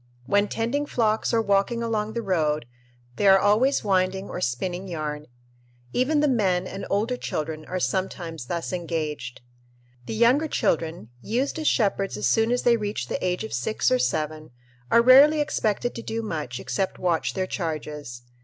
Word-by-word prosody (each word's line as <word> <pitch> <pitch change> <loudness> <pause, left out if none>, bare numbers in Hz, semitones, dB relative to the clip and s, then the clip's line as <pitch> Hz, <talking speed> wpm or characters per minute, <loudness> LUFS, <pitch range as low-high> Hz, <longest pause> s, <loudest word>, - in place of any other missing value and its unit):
When 205 +8 +2
tending 255 +8 -1
flocks 220 -4 +1
or 230 -1 +2
walking 200 +4 +1
along 220 -2 -1
the 235 0 -3
road 155 - 0 0.5
they 205 - +2
are 195 0 +8
always 215 +8 +3
winding 190 -1 0
or 180 - -5
spinning 175 +8 -2
yarn. 150 -3 -4 0.7
Even 290 +4 +2
the 300 - +3
men 190 -8 +1
and 195 +1 -6
older 220 +5 0
children 155 -8 -4
are 185 +3 -3
sometimes 170 -7 -3
thus 170 +3 -3
engaged. 160 -7 -4 0.7
The - - -3
younger 250 +8 +4
children, 160 - -1
used 255 - -1
as 310 - -1
shepherds 195 - +1
as 105 - -2
soon 225 - +3
as 245 - 0
they 235 -1 +4
reach 210 -1 -4
the - - -3
age 180 +2 -1
of 220 - -6
six 120 -2 0
or 125 - +3
seven, 155 +4 -2 0.4
are 235 - +5
rarely 280 +5 +7
expected 245 -5 0
to 230 - -6
do 230 0 -4
much 150 - -4
except 195 -2 -2
watch 175 -3 0
their 190 -1 0
charges. 150 -8 -5
195 Hz, 170 wpm, -25 LUFS, 160-230 Hz, 0.7 s, are